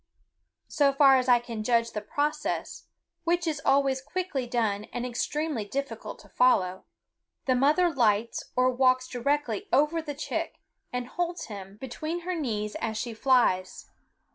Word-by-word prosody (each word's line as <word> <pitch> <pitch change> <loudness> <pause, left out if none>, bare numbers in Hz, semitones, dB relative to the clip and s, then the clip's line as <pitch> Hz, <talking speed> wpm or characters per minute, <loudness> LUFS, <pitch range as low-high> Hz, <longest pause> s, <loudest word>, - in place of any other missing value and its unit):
So 285 -3 +2
far 275 -1 +6
as 255 0 0
I 245 - +7
can 235 -2 -6
judge 230 0 +2
the 210 - -4
process, 300 +7 -2 0.4
which 345 +1 +1
is 305 -3 -2
always 270 -1 +2
quickly 290 -3 -3
done 220 -4 0
and 245 +2 -5
extremely 290 +1 -2
difficult 275 +7 -5
to - - -18
follow, 190 -7 +2 0.6
the 260 - +3
mother 295 +8 +4
lights 230 -3 +1
or 255 0 +3
walks 255 0 +3
directly 250 -2 -1
over 300 +5 +3
the 295 -2 -6
chick 295 - -4 0.3
and 250 0 -2
holds 345 +1 -3
him 195 0 -9
between 310 +8 -5
her 365 +2 -3
knees 215 -10 -2
as 220 -1 -2
she 235 0 -3
flies. 220 -7 +1
255 Hz, 150 wpm, -27 LUFS, 230-295 Hz, 0.6 s, I